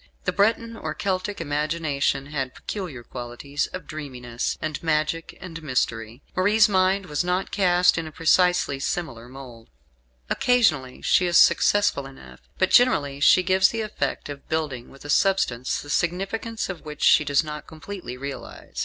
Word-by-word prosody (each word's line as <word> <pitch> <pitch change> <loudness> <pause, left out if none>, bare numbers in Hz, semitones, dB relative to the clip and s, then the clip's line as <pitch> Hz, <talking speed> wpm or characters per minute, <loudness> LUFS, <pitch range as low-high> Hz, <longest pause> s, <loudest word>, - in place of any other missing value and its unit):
The - - -1
Breton 230 +3 +1
or 155 -7 -5
Celtic 195 +3 -2
imagination 150 -3 -1
had 135 -3 -4
peculiar 175 - -6
qualities 125 +4 -4
of 185 -4 -8
dreaminess, 125 -6 -5
and 155 -2 -4
magic 160 0 -1
and 165 -3 -8
mystery. 120 -3 -2
Marie's 205 +3 +4
mind 190 0 +2
was 150 0 -1
not 180 +2 -1
cast 180 -3 +3
in 165 - -5
a - - -8
precisely 165 -3 +2
similar 130 -6 -4
mould. 125 -4 -12 0.6
Occasionally 155 - +1
she 180 - +3
is 175 -1 +3
successful 205 -9 +4
enough; 65 - -14 0.2
but 185 - +1
generally 145 - +4
she 185 +5 +5
gives 190 +1 +4
the 230 - -3
effect 215 - -3
of 145 -1 -9
building 150 -6 -3
with 135 +1 -15
a - - -8
substance 130 -12 +1
the 145 - -12
significance 195 +8 -2
of 185 -4 -6
which 150 -1 -7
she - - +6
does 145 +1 +2
not 150 -1 -7
completely 160 -4 -8
realise. 140 +1 -8
155 Hz, 155 wpm, -24 LUFS, 135-185 Hz, 0.6 s, she